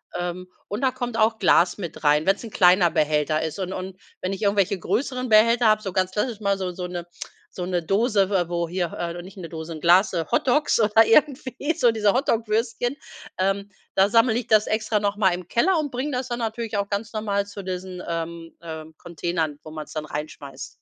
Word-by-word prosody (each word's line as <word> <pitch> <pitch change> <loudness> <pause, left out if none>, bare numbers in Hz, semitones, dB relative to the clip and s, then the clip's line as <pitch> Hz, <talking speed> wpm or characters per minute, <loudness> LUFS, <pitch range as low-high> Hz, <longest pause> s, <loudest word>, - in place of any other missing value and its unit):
Ähm, 180 +1 -4 0.2
und 205 +5 -4
da 260 -1 +2
kommt 245 -2 -4
auch 220 0 +2
Glas 175 +3 +4
mit 170 -3 -7
rein, 150 +1 +3
wenn's 195 +4 +2
'n 225 - -8
kleiner 180 -1 +5
Behälter 155 0 +1
ist. 160 +2 -4
Und 190 0 -3
und 190 +1 -7 0.2
wenn 185 - -2
ich 195 - -6
irgendwelche 200 -1 +2
größeren 255 +6 -2
Behälter 230 +2 +5
habe, 215 0 +4
so 195 -3 -4
ganz 185 0 +1
klassisch 210 +2 -2
mal 200 -2 0
so 185 -2 -3
so 180 0 -6
'ne 175 -1 -6 0.5
so 180 - -3
'ne 180 -1 -1
Dose, 200 +2 +2
w 185 -4 +1
wo 170 -1 -1
hier 175 -1 -2
äh, 170 0 -4
nicht 190 +1 -13
'ne 170 -3 -7
Dose, 160 0 -6
'n 155 - -7
Glas, 185 +4 +5
äh, 165 -2 0
Hotdogs 270 +2 +2
oder 220 +1 +5
irgendwie, 275 +3 +2
so 240 -4 +4
diese 210 -3 +2
Hotdog-Würstchen, 230 0 0 0.4
ähm, 195 +1 0 0.3
da 195 +1 +4
sammle 230 +1 +4
ich 240 -1 -1
das 215 -2 +4
extra 215 -1 0
noch 205 0 -1
mal 190 -3 +3
im 180 -1 -6
Keller 340 - +2
und 295 -2 -2
bringe 260 +4 -3
das 255 0 -2
dann 240 0 -3
natürlich 225 -1 -3
auch 200 0 -1
ganz 205 +2 -3
normal 205 -2 -1
zu 205 -1 -8
diesen, 185 -1 -5
ähm, 165 0 -5
äh, 160 -2 -7
Containern, 165 -3 -3
wo 155 - -10
man's 155 -1 -8
dann 155 -1 -4
reinschmeißt. 145 -3 -7
195 Hz, 215 wpm, -24 LUFS, 175-225 Hz, 0.5 s, kleiner